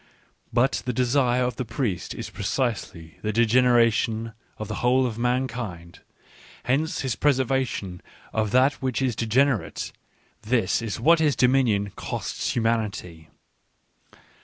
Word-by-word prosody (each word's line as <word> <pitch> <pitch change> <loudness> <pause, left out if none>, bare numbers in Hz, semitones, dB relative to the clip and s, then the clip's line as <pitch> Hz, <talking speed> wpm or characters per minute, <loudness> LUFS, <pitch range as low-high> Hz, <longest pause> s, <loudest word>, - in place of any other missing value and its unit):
But 130 +3 +2
the 125 - 0
desire 125 0 +2
of 125 0 -2
the 130 - -1
priest 115 -6 -3
is - - -6
precisely 95 - -3
the 105 - -1
degenera 115 +1 +4
tion 115 0 -2 0.2
of 110 - -5
the - - -4
whole 130 +2 +3
of 115 -2 -4
mankind; 120 -9 -3 0.6
hence 150 +6 0
his 130 -3 -1
preservation 130 -9 0 0.3
of 110 -1 0
that 130 +6 +3
which 130 -3 -1
is 130 -4 0
degenerate 120 +2 0 0.3
— - - -38
this 115 -6 +2
is 115 -2 -4
what 165 +7 +5
his 150 -3 +2
dom 125 0 +3
inion 105 -7 +1
costs - - -4
humanity. 105 -8 -2
120 Hz, 135 wpm, -25 LUFS, 110-130 Hz, 0.6 s, what